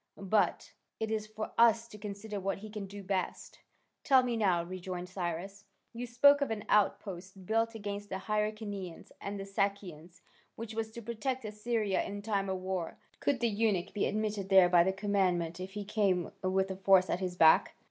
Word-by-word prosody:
But 200 -1 0 0.3
it 220 0 -2
is 215 -1 -2
for 215 0 -6
us 230 0 +5
to 210 - -11
consider 205 0 -6
what 195 +1 -2
he 210 +2 -10
can 210 -2 -5
best 195 -1 -4
do." - - -21 0.4
"Tell 265 -2 +5
me 245 -2 -1
now," 185 -6 +2
rejoined 180 0 -6
Cyrus, 185 +2 -4 0.3
"you 240 +1 -5
spoke 285 +4 +5
of 280 - +1
an 220 -2 -4
outpost, 195 -2 0
built 225 +2 +1
against 205 -1 -5
the - - -3
Hyrcanians 210 -3 -3
and 200 0 -4
the - - -4
Sakians, 185 -4 -3 0.3
which 225 -1 -7
was 220 0 -2
to 235 - -8
protect 235 +3 -3
Assyria 210 -1 -1
in 205 0 -6
time 200 -2 -1
of 190 - -1
war, 185 -2 -4 0.2
could 275 -4 0
the 235 - +3
eunuch 205 -5 0
be 205 - +1
admitted 210 -2 -2
there 190 -2 +7
by 175 -1 +6
the 190 - +1
commandant 190 -4 0
if 185 +1 -6
he 205 -1 -5
came 195 -5 +1
with 190 +1 +1
a 190 - -5
force 190 -1 +5
at 175 - -1
his 180 -2 -3
back?" 160 -2 +5
200 Hz, 190 wpm, -32 LUFS, 185-220 Hz, 0.4 s, there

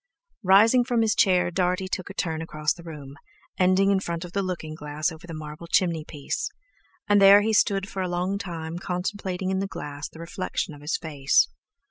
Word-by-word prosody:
Rising 215 +6 +6
from 240 -2 +1
his 220 -1 +2
chair, 180 -3 +3
Dartie 180 +1 0
took 185 0 -4
a 195 - -9
turn 160 -4 -2
across 155 -1 -1
the 175 - -13
room, 145 -4 -9 0.4
ending 185 +2 +4
in 195 - +3
front 170 -2 -4
of 175 - -10
the 200 - 0
looking 175 -5 -4
glass 150 +1 -3
over 165 +1 -11
the 165 - -7
marble 155 +2 -8
chimney 170 -3 +1
piece; 150 -2 -4 0.6
and 205 -1 +4
there 200 +1 +9
he 220 +1 0
stood 200 -2 +2
for 190 - -4
a 185 - -2
long 180 +3 -1
time 170 -3 -5
contemplating 185 0 -3
in 190 - 0
the 195 - -1
glass 145 -5 -6
the - - -15
reflection 170 -1 -4
of 145 - -13
his 150 +3 -1
face. 145 -4 +2
180 Hz, 200 wpm, -25 LUFS, 160-195 Hz, 0.6 s, there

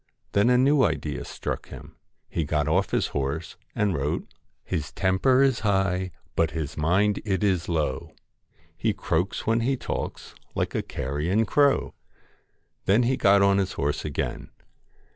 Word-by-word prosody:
Then 100 +4 +3
a 125 - +5
new 140 +3 +4
idea 75 -1 -1
struck - - -5
him. - - -11 0.3
He 85 - -2
got 75 -1 0
off 95 +5 +2
his - - 0
horse 75 +3 -3 0.2
and 105 -3 +1
wrote 70 -2 -1 0.2
' - - -48
His 70 -4 -2
temper 125 +9 +3
is 135 -3 +2
high, 95 -3 +1 0.3
but 85 -1 +2
his 75 -1 -4
mind 95 +7 +2
it 100 -1 -1
is 95 -5 +1
low, 75 -6 -2 0.6
He - - 0
croaks 90 +4 -1
when 115 +1 +2
he 130 +3 0
talks - - -5 0.2
like - - -1
a - - 0
carrion 75 - -1
crow.' 140 +4 +2 0.9
Then 105 +6 +4
he 130 +2 +2
got 100 -5 +4
on 100 0 +4
his 95 -2 -1
horse 75 +1 -1
again. 75 -3 -3
95 Hz, 160 wpm, -26 LUFS, 75-105 Hz, 0.9 s, a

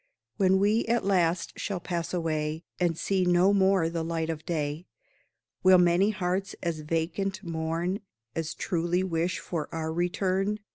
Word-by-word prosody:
When 190 0 +4
we, 210 +4 +3
at 235 -1 +1
last, 180 -3 +1
shall 195 -3 -2
pass 170 -1 -3
away, 160 -2 -1 0.2
And 175 -3 +1
see 190 +1 +1
no 180 +2 +4
more 190 -3 +3
the 165 0 -2
light 165 0 -1
of 160 -1 -6
day, 155 0 -2 0.7
Will 185 0 +7
many 175 +3 +4
hearts 190 -1 -2
as 170 -3 -1
vacant 165 +6 -2
mourn 165 +3 -2 0.4
As 160 0 -3
truly 175 +1 0
wish 175 0 -1
for 160 -4 -4
our 160 -1 -3
return? 190 +4 0
175 Hz, 150 wpm, -28 LUFS, 165-190 Hz, 0.7 s, Will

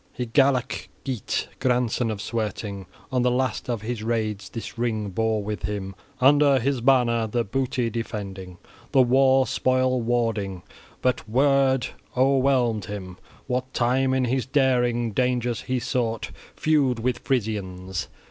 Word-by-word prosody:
Hygelac 130 +1 +1 0.2
Geat, 130 -7 -2
grandson 125 -2 +1
of 110 -1 -4
Swerting, 105 -4 -4 0.2
on 130 -1 +1
the 125 - +3
last 125 -1 -1
of 115 -4 -2
his 115 0 -3
raids 110 -3 -2
this 115 - -7
ring 110 -4 -2
bore 110 +2 0
with 105 +1 -4
him, 100 -2 -4 0.3
under 140 +1 +5
his 130 0 0
banner 120 -3 +3
the 120 +2 0
booty 125 +1 -1
defending, 100 -5 -5 0.4
the 130 - +6
war 130 +1 +4
spoil 130 -1 +1
warding; 115 -6 -1 0.4
but 125 -1 +3
Wyrd 135 0 +3 0.3
o'erwhelmed 130 -5 +2
him 95 -3 -7 0.3
what 130 +1 -2
time, 130 +2 +2
in 130 -1 +2
his 130 0 -1
daring, 125 -4 +2
dangers 125 0 0
he 130 - -2
sought, 115 -3 -2 0.2
feud 145 -6 +2
with 120 +1 -1
Frisians. 95 -7 -2
120 Hz, 135 wpm, -24 LUFS, 110-130 Hz, 0.4 s, the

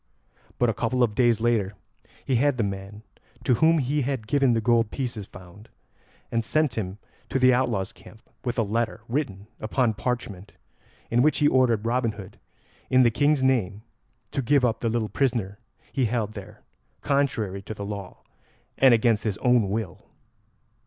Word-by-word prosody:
But 120 - +2
a 115 - +1
couple 125 +2 0
of 110 -3 +1
days 120 -1 +3
later 110 -4 0 0.5
he 130 - +1
had 140 +1 +2
the 115 - +1
man 100 +2 -6 0.4
to - - +3
whom 165 +1 +5
he 145 +1 0
had 130 -4 -2
given 135 +1 +2
the 115 - +2
gold 115 0 +2
pieces 120 -6 -4
found, 95 +4 -14 0.6
and 115 0 0
sent 155 +3 +1
him 95 -3 -4 0.3
to - - 0
the 130 -1 +5
outlaws' 120 -6 0
camp 110 - -16 0.2
with 120 0 -3
a 115 - +3
letter 115 +2 -2
written 115 -7 -3
upon 115 +1 0
parchment, 105 -5 -4 0.6
in 120 +1 +3
which 155 +3 +3
he 145 - +3
ordered 120 -6 +2
Robin 120 -1 0
Hood, 100 0 -11 0.5
in 130 0 +5
the 120 - +4
King's 145 +2 +2
name, 110 -6 +1 0.5
to 140 - -1
give 135 +1 +3
up 115 -2 0
the 115 - -1
little 115 -1 -1
prisoner 115 -6 -1 0.3
he 135 -3 +1
held 110 -2 -1
there 105 +1 -11 0.4
contrary 120 -9 0
to 110 +2 -7
the 100 - -6
law 100 -3 -7 0.6
and 130 -3 +7
against 115 -1 +2
his 105 -4 -2
own 125 -5 +2
will. 105 -2 -4
115 Hz, 175 wpm, -25 LUFS, 105-130 Hz, 0.6 s, and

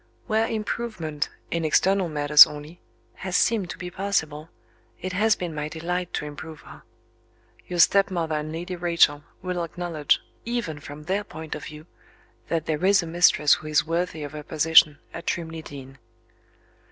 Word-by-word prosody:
Where 220 +1 +1
improvement 215 -9 -3 0.2
(in 170 -1 -1
external 185 +4 +2
matters 150 0 +8
only) 150 +3 -10 0.4
has 185 -1 -1
seemed 210 -6 +1
to - - -6
be 180 -1 -7
possible, 165 -5 -2 0.5
it 185 +1 -5
has 215 +3 +3
been 175 -3 -5
my 150 0 -4
delight 175 +3 -3
to - - -3
improve 150 +1 -9
her. - - -14 0.9
Your 180 - -4
stepmother 175 -2 +3
and 150 0 -3
Lady 175 +3 -5
Rachel 170 -4 +2 0.2
will 180 -2 -2
acknowledge, 165 -3 0 0.2
even 230 -11 -3
from 145 +1 -10
their 195 +6 -1
point 160 -5 -8
of 150 - -7
view, 155 0 -10 0.6
that 165 -2 -1
there 155 +1 -2
is 195 0 +4
a - - -5
mistress 165 -3 +4
who 155 - -3
is 150 -1 +2
worthy 165 -1 -2
of 145 - -6
her 150 -1 -7
position 155 0 +4 0.2
at 170 - -8
Trimley 165 -1 -3
Deen." 135 -2 -11
165 Hz, 165 wpm, -25 LUFS, 150-180 Hz, 0.9 s, matters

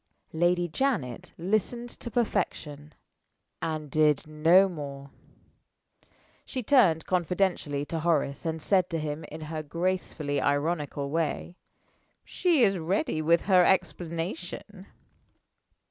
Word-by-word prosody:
Lady 175 +2 +2
Janet 175 - -2
listened 215 +6 -1
to 235 - -7
perfection 155 - -2 0.7
and 155 -3 -3
did 150 -1 +3
no 165 +5 +5
more. 140 -5 -7 1.3
She 255 - -5
turned 205 - +4
confidentially 175 -5 0
to 165 +2 -3
Horace, 155 -4 0
and 160 -2 -3
said 185 -2 +2
to 165 -2 -2
him, 150 +1 -4
in 155 +1 -9
her 155 0 -4
gracefully 160 -2 -2
ironical 145 -1 -1
way: 165 +2 -2 0.7
"She 335 -8 +2
is 195 -3 +3
ready 160 -2 -1
with 170 +2 +3
her 185 -3 +5
explanation." 175 +2 -2
165 Hz, 110 wpm, -28 LUFS, 150-185 Hz, 1.3 s, no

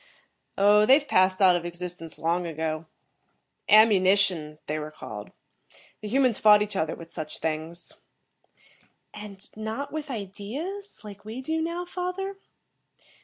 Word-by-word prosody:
"Oh, 205 +1 +6
they've 280 +2 +5
passed 185 -2 +3
out 185 -2 +7
of 175 - -1
existence 175 -1 -6
long 170 +2 0
ago. 160 0 -3 0.8
'Ammunition' 190 -7 +4
they 155 +1 -2
were 150 0 -5
called. 105 -8 -8 0.7
The 215 - -5
humans 255 0 +2
fought 210 -1 +7
each 205 -1 -6
other 160 -3 -1
with 165 0 -12
such 155 -1 -5
things." 160 +2 -4 1.1
"And 200 -2 -10
not 220 +7 -4
with 310 -1 -4
ideas, 260 - -6
like 205 -1 -10
we 220 +4 -7
do 320 +5 -2
now, 340 +2 -3
father?" 365 +2 -4
200 Hz, 130 wpm, -26 LUFS, 170-260 Hz, 1.1 s, out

